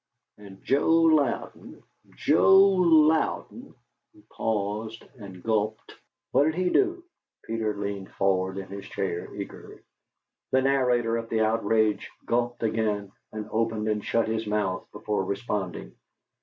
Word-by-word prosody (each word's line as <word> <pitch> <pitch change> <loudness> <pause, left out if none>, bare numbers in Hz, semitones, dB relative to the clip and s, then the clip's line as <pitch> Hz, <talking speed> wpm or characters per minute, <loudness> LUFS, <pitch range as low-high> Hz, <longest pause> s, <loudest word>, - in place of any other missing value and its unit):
And 100 -2 -13
Joe 140 +4 +1
Louden 160 -5 +1 0.3
Joe 190 - +5
Louden 170 -5 +3 0.2
" - - -56
He - - -20
paused 110 +1 -3 0.2
and 95 -4 -11
gulped. 110 -1 -1 0.4
"What 145 - +4
did 160 0 0
he 180 0 0
do?" 360 -2 +1 0.4
Peter 110 -2 -2
leaned 100 -1 -4
forward 95 0 0
in 95 - -5
his 100 0 -8
chair 95 -3 -4
eagerly. 100 -1 -8 0.8
The 130 0 +4
narrator 125 -4 +2
of 115 0 -6
the 110 -1 0
outrage 110 -1 +1 0.2
gulped 120 0 -1
again, 105 -3 -1 0.2
and 110 -1 -6
opened 110 -1 -1
and 105 -1 -1
shut 115 -1 0
his 110 0 -2
mouth 105 -3 -1
before 105 -2 -2
responding. 100 -2 -4
110 Hz, 130 wpm, -26 LUFS, 100-125 Hz, 0.8 s, Joe